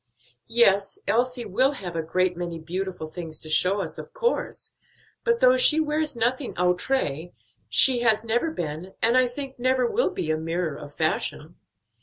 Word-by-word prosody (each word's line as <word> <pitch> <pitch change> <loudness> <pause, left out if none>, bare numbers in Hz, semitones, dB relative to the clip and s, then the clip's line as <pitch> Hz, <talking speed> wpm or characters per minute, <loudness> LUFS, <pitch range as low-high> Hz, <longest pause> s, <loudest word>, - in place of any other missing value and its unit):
"Yes, 200 -4 +3
Elsie 245 +1 0
will 255 +8 +2
have 180 -9 -7
a 165 - 0
great 180 +3 0
many 170 -1 -5
beautiful 180 +1 -5
things 160 -1 -7
to 155 - -7
show 190 +5 +3
us, 165 - -6
of - - -10
course; 485 -1 -2 0.5
but, 470 0 +1
though - - +6
she 325 -11 +5
wears 305 -2 -1
nothing 245 +3 -1
outré, 180 - 0 0.4
she 250 - +5
has 225 -2 +3
never 235 +7 0
been, 170 - -6
and 230 +2 +4
I 255 0 +4
think 265 +1 -7
never 255 0 +2
will 435 - +1
be 165 - -3
a 155 - 0
mirror 165 0 -2
of 145 0 -11
fashion. 160 0 -2
200 Hz, 170 wpm, -25 LUFS, 170-260 Hz, 0.5 s, though